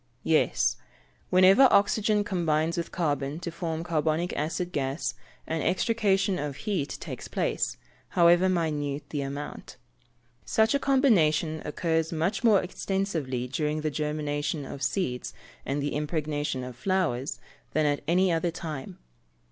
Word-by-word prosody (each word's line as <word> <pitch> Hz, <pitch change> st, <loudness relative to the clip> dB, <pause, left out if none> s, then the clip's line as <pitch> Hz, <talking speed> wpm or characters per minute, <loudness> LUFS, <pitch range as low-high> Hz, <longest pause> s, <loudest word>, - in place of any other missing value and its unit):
_ -, -, -41 dB, 0.2 s
Yes; -, -, +2 dB, 0.5 s
whenever 190 Hz, +8 st, +7 dB
oxygen 210 Hz, +1 st, +3 dB
combines 165 Hz, -4 st, 0 dB
with 170 Hz, -1 st, -3 dB
carbon 145 Hz, -3 st, -1 dB
to 170 Hz, -, -4 dB
form 165 Hz, -1 st, -3 dB
carbonic 165 Hz, 0 st, 0 dB
acid 170 Hz, +4 st, -2 dB
gas, 140 Hz, -1 st, -2 dB, 0.3 s
an 160 Hz, -1 st, -2 dB
extrication 195 Hz, 0 st, +1 dB
of 145 Hz, -2 st, -3 dB
heat 190 Hz, -10 st, -1 dB
takes -, -, -7 dB
place, -, -, -1 dB, 0.4 s
however 175 Hz, +2 st, +6 dB
minute 150 Hz, -5 st, -1 dB
the 145 Hz, -, -2 dB
amount. 140 Hz, +2 st, -6 dB, 0.7 s
Such 220 Hz, +2 st, +2 dB
a 280 Hz, -, +2 dB
combination 170 Hz, -, +3 dB
occurs 160 Hz, +1 st, 0 dB
much 170 Hz, +7 st, -1 dB
more 215 Hz, -5 st, +5 dB
extensively 170 Hz, -10 st, -2 dB
during 150 Hz, +3 st, -1 dB
the 155 Hz, 0 st, -1 dB
germination 150 Hz, 0 st, -2 dB
of 135 Hz, -, -8 dB
seeds 125 Hz, -11 st, -2 dB, 0.3 s
and 140 Hz, +1 st, -1 dB
the 145 Hz, -, -2 dB
impregnation 150 Hz, -3 st, -2 dB
of 125 Hz, -1 st, -7 dB
flowers, 155 Hz, -4 st, -1 dB, 0.3 s
than 155 Hz, -1 st, +2 dB
at 145 Hz, -1 st, +1 dB
any 180 Hz, +2 st, +3 dB
other 165 Hz, +1 st, +1 dB
time. 160 Hz, +1 st, -6 dB
160 Hz, 135 wpm, -27 LUFS, 145-185 Hz, 0.7 s, whenever